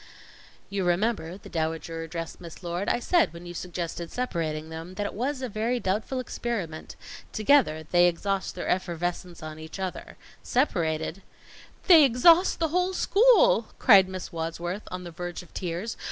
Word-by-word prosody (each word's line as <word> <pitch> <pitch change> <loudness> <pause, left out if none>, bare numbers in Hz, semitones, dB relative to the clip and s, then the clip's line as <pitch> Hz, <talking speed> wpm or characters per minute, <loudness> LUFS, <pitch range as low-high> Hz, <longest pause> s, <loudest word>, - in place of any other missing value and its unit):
"You 200 -1 -1
remember," 180 -1 0
the - - -14
Dowager 165 0 -3
addressed 165 +1 -6
Miss 170 +1 -11
Lord, 175 +3 -2
"I - - +2
said 335 +8 +2
when 170 +1 -10
you 175 - -7
suggested 170 -1 -5
separating 160 -10 -3
them, 165 +3 -8
that 205 - -2
it - - -4
was 260 +4 -2
a - - -1
very 230 +3 -1
doubtful 215 +6 -1
experiment. 220 -10 -4 0.4
Together, 215 - +3
they 175 +3 +4
exhaust 195 +3 -2
their - - -5
effervescence 175 -1 -2
on 155 0 -7
each 160 +3 -8
other; 185 -1 -5 0.2
separated 170 - 0 0.3
" - - -22
"They 335 -5 +9
exhaust 325 +8 +5
the 325 -1 +1
whole 360 +3 +1
school!" - - +4
cried 195 -6 +6
Miss 185 -1 -6
Wadsworth, 170 +4 -4
on 180 0 -6
the 175 - -8
verge 175 +2 -6
of 180 - -20
tears. 180 +5 -4
180 Hz, 165 wpm, -27 LUFS, 165-240 Hz, 0.4 s, They